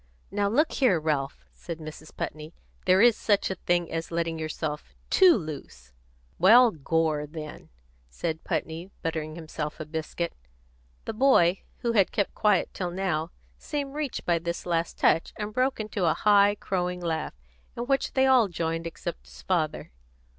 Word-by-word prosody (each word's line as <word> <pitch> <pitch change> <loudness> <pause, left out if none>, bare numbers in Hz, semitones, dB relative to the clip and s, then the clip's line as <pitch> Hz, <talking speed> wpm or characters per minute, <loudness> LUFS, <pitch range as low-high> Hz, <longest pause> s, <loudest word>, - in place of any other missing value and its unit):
"Now 200 0 +1
look 300 +9 +2
here, 245 - +3
Ralph," 145 -3 -2
said 170 -3 -7
Mrs. 155 -1 -10
Putney, 155 +2 -5 0.3
"there's 210 +5 +6
such 205 -3 +1
a - - -2
thing 175 -1 +2
as 165 0 -3
letting 165 -1 -2
yourself 155 -1 -4 0.2
too 370 -3 +7
loose." 145 - -8 0.5
"Well, 230 +6 +7
gore, 155 -1 0
then," 155 -1 -9 0.4
said 160 - -4
Putney, 165 +3 -3
buttering 155 -2 -3
himself 155 -2 -5
a 155 - -5
biscuit. 160 +2 -4 0.7
The - - -3
boy, 215 -7 +4 0.2
who 235 - +1
had 200 -5 +3
kept 205 -3 -1
quiet 210 -3 +2
till 180 -2 -3
now, 175 -3 -1 0.3
seemed 285 -3 -4
reached 295 -3 -4
by 170 -1 +2
this 170 +1 -4
last 170 -1 -1
touch, 165 - +2
and 210 -1 -5
broke 255 +2 +1
into 210 -3 -2
a 160 - +3
high, 205 -1 +5
crowing 180 -3 -2
laugh, 165 -2 -2 0.4
in 240 - -2
which 270 +2 0
they 265 0 +3
all 255 -5 +5
joined 165 -1 -2
except - - -7
his 60 0 -14
father. - - -1
170 Hz, 160 wpm, -27 LUFS, 160-210 Hz, 0.7 s, too